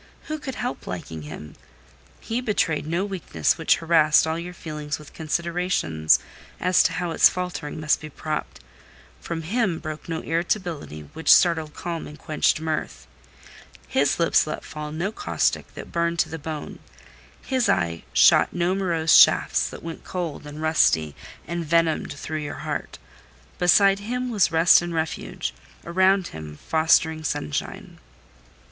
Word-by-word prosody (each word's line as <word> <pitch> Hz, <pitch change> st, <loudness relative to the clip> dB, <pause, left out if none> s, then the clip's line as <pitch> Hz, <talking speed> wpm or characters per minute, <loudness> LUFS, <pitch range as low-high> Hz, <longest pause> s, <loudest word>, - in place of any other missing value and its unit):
Who 310 Hz, 0 st, -5 dB
could 265 Hz, -3 st, -6 dB
help 245 Hz, -, -4 dB
liking 80 Hz, -3 st, -6 dB
him? 75 Hz, 0 st, -9 dB, 0.7 s
He 230 Hz, +2 st, -3 dB
betrayed 175 Hz, -10 st, 0 dB
no 170 Hz, +5 st, 0 dB
weakness 190 Hz, -3 st, -1 dB
which 160 Hz, -, +4 dB
harassed 160 Hz, -2 st, +4 dB
all 160 Hz, +1 st, -2 dB
your 175 Hz, +1 st, -6 dB
feelings 150 Hz, -3 st, -5 dB
with 150 Hz, -1 st, -14 dB
considerations 165 Hz, -, +1 dB, 0.4 s
as 180 Hz, 0 st, +4 dB
to 165 Hz, -, +1 dB
how 175 Hz, +1 st, -2 dB
its -, -, +6 dB
faltering 175 Hz, -4 st, -5 dB
must 155 Hz, 0 st, +1 dB
be 155 Hz, -, -8 dB
propped; 140 Hz, -, -5 dB, 0.6 s
from 165 Hz, -1 st, -5 dB
him 195 Hz, -1 st, 0 dB
broke 155 Hz, +1 st, -7 dB
no 160 Hz, -1 st, -2 dB
irritability 165 Hz, -, -2 dB
which 160 Hz, -, +2 dB
startled 160 Hz, -3 st, +4 dB
calm 170 Hz, -2 st, -5 dB
and 150 Hz, -, -11 dB
quenched 155 Hz, 0 st, +1 dB
mirth; 155 Hz, -, -4 dB, 0.8 s
his 140 Hz, +1 st, +1 dB
lips 165 Hz, -2 st, +3 dB
let 155 Hz, -, -5 dB
fall 150 Hz, 0 st, -7 dB
no 170 Hz, +6 st, -2 dB
caustic 410 Hz, -, -1 dB
that -, -, -9 dB
burned 170 Hz, 0 st, 0 dB
to -, -, +1 dB
the 160 Hz, -, -6 dB
bone; 155 Hz, 0 st, -6 dB, 0.7 s
his 260 Hz, -3 st, +1 dB
eye 85 Hz, -1 st, 0 dB
shot -, -, +5 dB
no 175 Hz, +1 st, 0 dB
morose 170 Hz, -5 st, +2 dB
shafts -, -, +5 dB
that -, -, -10 dB
went 165 Hz, 0 st, -7 dB
cold, 165 Hz, -5 st, -5 dB
and 150 Hz, +2 st, -7 dB
rusty, 80 Hz, -, +2 dB, 0.3 s
and 170 Hz, +1 st, -3 dB
venomed 165 Hz, 0 st, +1 dB
through 155 Hz, +2 st, -5 dB
your 145 Hz, -1 st, -6 dB
heart: -, -, -4 dB, 0.6 s
beside 195 Hz, +2 st, +5 dB
him 250 Hz, +4 st, -3 dB
was 200 Hz, -6 st, +2 dB
rest 165 Hz, +2 st, +6 dB
and 175 Hz, -1 st, -4 dB
refuge—around 170 Hz, -, -1 dB
him, 75 Hz, -1 st, -9 dB
fostering 160 Hz, 0 st, +3 dB
sunshine. 75 Hz, -, -4 dB
160 Hz, 150 wpm, -24 LUFS, 150-175 Hz, 0.8 s, its